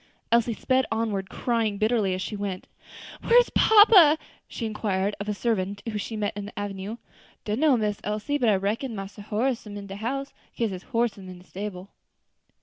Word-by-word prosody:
Elsie 235 Hz, -1 st, +3 dB
sped 260 Hz, +2 st, +1 dB
onward, 215 Hz, -4 st, -1 dB
crying 225 Hz, -4 st, -1 dB
bitterly 215 Hz, -3 st, +1 dB
as 185 Hz, -, -3 dB
she 210 Hz, -, -4 dB
went. 200 Hz, -2 st, -4 dB, 0.6 s
"Where 475 Hz, -, +4 dB
is -, -, +5 dB
papa!" 410 Hz, -8 st, +7 dB, 0.3 s
she 235 Hz, -, -5 dB
inquired 205 Hz, -2 st, -1 dB
of 205 Hz, +1 st, -4 dB
a -, -, +1 dB
servant 200 Hz, -3 st, -1 dB
whom 215 Hz, -2 st, -3 dB
she 220 Hz, -, -5 dB
met 205 Hz, -2 st, -2 dB
in 205 Hz, -1 st, -5 dB
the 210 Hz, -, -12 dB
avenue. 205 Hz, +2 st, -5 dB, 0.5 s
"Dunno, 255 Hz, +6 st, +3 dB
Miss 210 Hz, -2 st, -1 dB
Elsie, 215 Hz, +8 st, -2 dB
but 240 Hz, -4 st, +3 dB
I 205 Hz, -, +4 dB
reckon 220 Hz, +6 st, -2 dB
Massa 195 Hz, +1 st, -7 dB
Horace 225 Hz, +3 st, -1 dB
am 205 Hz, 0 st, -7 dB
in 200 Hz, -, -7 dB
de 195 Hz, 0 st, -8 dB
house, 275 Hz, +6 st, -3 dB, 0.2 s
kase 230 Hz, -3 st, -1 dB
his 185 Hz, -1 st, -6 dB
horse 235 Hz, -3 st, 0 dB
am 190 Hz, -1 st, -10 dB
in 180 Hz, -, -9 dB
de 180 Hz, -, -17 dB
stable." 195 Hz, -1 st, -7 dB
210 Hz, 195 wpm, -26 LUFS, 200-235 Hz, 0.6 s, papa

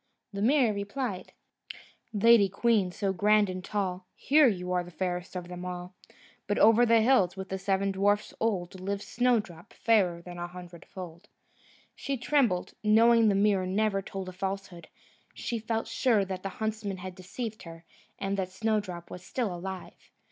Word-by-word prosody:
The 200 Hz, -, -4 dB
mirror 245 Hz, -1 st, +3 dB
replied: 205 Hz, 0 st, -4 dB, 0.8 s
"Lady 220 Hz, -1 st, +5 dB
queen, 200 Hz, -2 st, +2 dB
so 195 Hz, +1 st, -1 dB
grand 210 Hz, 0 st, +3 dB
and 185 Hz, 0 st, -6 dB
tall, 185 Hz, -2 st, -3 dB
Here, 295 Hz, 0 st, +5 dB
you 180 Hz, -5 st, -1 dB
are 180 Hz, -1 st, -1 dB
fairest 180 Hz, 0 st, -4 dB
of 180 Hz, -1 st, -5 dB
them 180 Hz, 0 st, -7 dB
all: 180 Hz, 0 st, -6 dB, 0.5 s
But 205 Hz, -, 0 dB
over 225 Hz, +3 st, +6 dB
the 230 Hz, 0 st, +5 dB
hills, 210 Hz, -7 st, +3 dB
with 190 Hz, 0 st, -6 dB
the 190 Hz, -, -3 dB
seven 195 Hz, 0 st, 0 dB
dwarfs 205 Hz, +2 st, +1 dB
old, 190 Hz, -5 st, -1 dB
Lives 200 Hz, +1 st, -3 dB
Snowdrop, 220 Hz, -9 st, -1 dB
fairer 185 Hz, -7 st, +2 dB
a 175 Hz, -1 st, -6 dB
hundredfold." 175 Hz, +1 st, -10 dB, 0.7 s
She 275 Hz, -1 st, -3 dB
trembled, 245 Hz, -8 st, +1 dB
knowing 225 Hz, +1 st, +5 dB
the 200 Hz, -, +2 dB
mirror 195 Hz, -2 st, +2 dB
never 200 Hz, +1 st, +1 dB
told 195 Hz, -1 st, -6 dB
a -, -, -5 dB
falsehood; 190 Hz, -3 st, -5 dB, 0.5 s
she 235 Hz, -, -3 dB
felt 225 Hz, +1 st, -2 dB
sure 225 Hz, -6 st, +2 dB
that 190 Hz, -1 st, -5 dB
the 195 Hz, -, -4 dB
huntsman 215 Hz, -1 st, -3 dB
had 185 Hz, 0 st, -7 dB
deceived 215 Hz, +5 st, -6 dB
her, 165 Hz, 0 st, -11 dB, 0.3 s
and 195 Hz, 0 st, -2 dB
that 185 Hz, -1 st, -2 dB
Snowdrop 190 Hz, -4 st, -2 dB
was 180 Hz, -, -8 dB
still 220 Hz, 0 st, -2 dB
alive. 185 Hz, +1 st, -8 dB
195 Hz, 160 wpm, -29 LUFS, 180-220 Hz, 0.8 s, over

